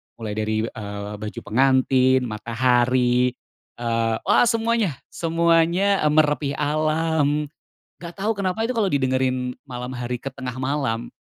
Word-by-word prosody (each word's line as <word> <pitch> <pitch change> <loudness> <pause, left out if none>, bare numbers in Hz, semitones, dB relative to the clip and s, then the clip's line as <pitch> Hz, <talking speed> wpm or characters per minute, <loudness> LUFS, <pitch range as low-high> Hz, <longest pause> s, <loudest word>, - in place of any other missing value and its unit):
mulai 110 -2 -6
dari, 110 0 -1
eee, 105 -2 -6
"Baju 105 0 -6
Pengantin," 130 +1 +3
"Matahari," 125 +2 +2 0.5
eee, 115 -1 0
wah - - +5
semuanya 230 - +1
semuanya, 170 +3 +2
eee, 150 - +3
"Merepih 150 -2 +2
Alam." 155 0 0 0.5
Nggak 170 0 -7
tau 210 +3 0
kenapa 200 +1 -2
itu 250 - -1
kalo 205 -3 +2
didengerin 130 -3 0
malam 125 -1 -6
hari 125 0 -3
ke - - -7
tengah 130 -2 -6
malam 130 -4 -2
130 Hz, 130 wpm, -23 LUFS, 120-160 Hz, 0.5 s, wah